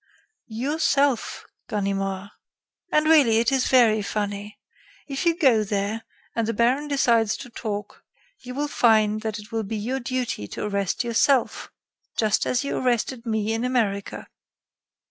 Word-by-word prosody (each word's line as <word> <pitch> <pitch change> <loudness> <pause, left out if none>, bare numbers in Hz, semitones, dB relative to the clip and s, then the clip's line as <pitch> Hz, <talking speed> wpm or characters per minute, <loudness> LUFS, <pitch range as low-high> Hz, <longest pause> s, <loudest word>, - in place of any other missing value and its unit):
"Yourself, 275 +1 0 0.2
Ganimard. 195 -2 -2 0.6
And, 305 0 +3
really, 290 -8 +5
it 235 +3 +2
is 265 -2 +2
very 230 -4 +4
funny. 205 0 -4 0.5
If 280 +4 -3
you 335 0 +3
go 255 - +4
there, 205 +2 -2 0.3
and 230 -1 0
the 230 - -1
baron 255 +6 +2
decides 235 -6 +2
to 245 - -10
talk, 210 -3 -6 0.4
you 250 0 -9
will 295 +1 -1
find 215 -5 +3
that 220 -1 -3
it 210 +1 -11
will 225 0 -1
be 220 +1 -4
your 245 +6 -2
duty 250 - -3
to - - -6
arrest 200 +1 -1
yourself, 240 +2 +1 0.5
just 215 -2 +1
as 255 +2 0
you 280 - -2
arrested 245 -1 -1
me 220 -1 0
in 225 +1 -2
America. 220 -6 -1
230 Hz, 145 wpm, -24 LUFS, 210-255 Hz, 0.6 s, really